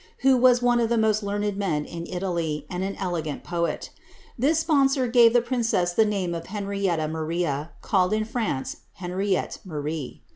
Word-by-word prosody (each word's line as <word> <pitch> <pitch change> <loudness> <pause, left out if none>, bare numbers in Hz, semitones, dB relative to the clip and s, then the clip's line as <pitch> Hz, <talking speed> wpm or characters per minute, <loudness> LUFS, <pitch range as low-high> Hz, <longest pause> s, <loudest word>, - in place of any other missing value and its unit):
who 265 0 +5
was 250 -1 +5
one 245 0 +4
of 230 -1 +1
the 235 - +2
most 220 -1 +2
learned 205 0 -2
men 160 -7 -1
in 170 0 -7
Italy, 170 -4 -2
and 180 +1 -2
an 195 +1 -3
elegant 165 -6 -3
poet 170 -1 -2 0.4
This 285 +6 +2
sponsor 280 -4 +3
gave 235 -1 +6
the 240 0 +3
princess 225 -8 0
the 220 - +4
name 195 -4 -1
of 165 0 -5
Henrietta 195 -5 -1
Maria, 160 -1 -2
called 185 -2 +2
in 215 0 +1
France, 220 - -2 0.2
Henriette 185 +1 -2
Marie. 150 -4 -5
195 Hz, 170 wpm, -25 LUFS, 170-230 Hz, 0.4 s, gave